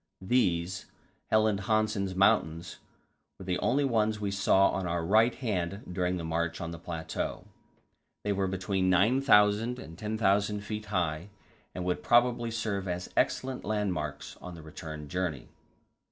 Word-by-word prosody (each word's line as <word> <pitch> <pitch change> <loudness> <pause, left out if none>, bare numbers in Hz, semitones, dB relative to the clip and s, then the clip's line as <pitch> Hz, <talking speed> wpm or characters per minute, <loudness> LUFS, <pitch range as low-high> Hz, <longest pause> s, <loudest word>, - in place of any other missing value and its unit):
These 95 -4 0 0.4
Helland 110 -2 +3
Hansen's 110 -3 0
Mountains 85 -3 +2 0.6
were 95 - -10
the 90 -1 -1
only 140 +3 +2
ones 110 -4 +1
we 100 -1 -2
saw 95 0 +4
on 95 -2 -2
our 85 -1 -1
right 110 +6 +4
hand 100 -5 -2
during 90 0 0
the 85 - -5
march 80 0 -2
on 85 0 -4
the 85 - -7
plateau; 80 -1 -4 0.8
they 105 - 0
were 95 -1 0
between 95 0 0
9,000 105 +2 +4
and 80 -9 -10
10,000 105 -1 +1
feet 105 0 -5
high, 90 -2 -1 0.5
and 90 - -4
would 90 -1 -1
probably 120 0 +3
serve 110 -4 -2
as 90 0 -4
excellent 130 -1 0
landmarks 95 -9 -3
on 90 -1 -8
the 80 - -11
return 75 -1 -8
journey. 85 -5 -3
95 Hz, 145 wpm, -29 LUFS, 85-110 Hz, 0.8 s, saw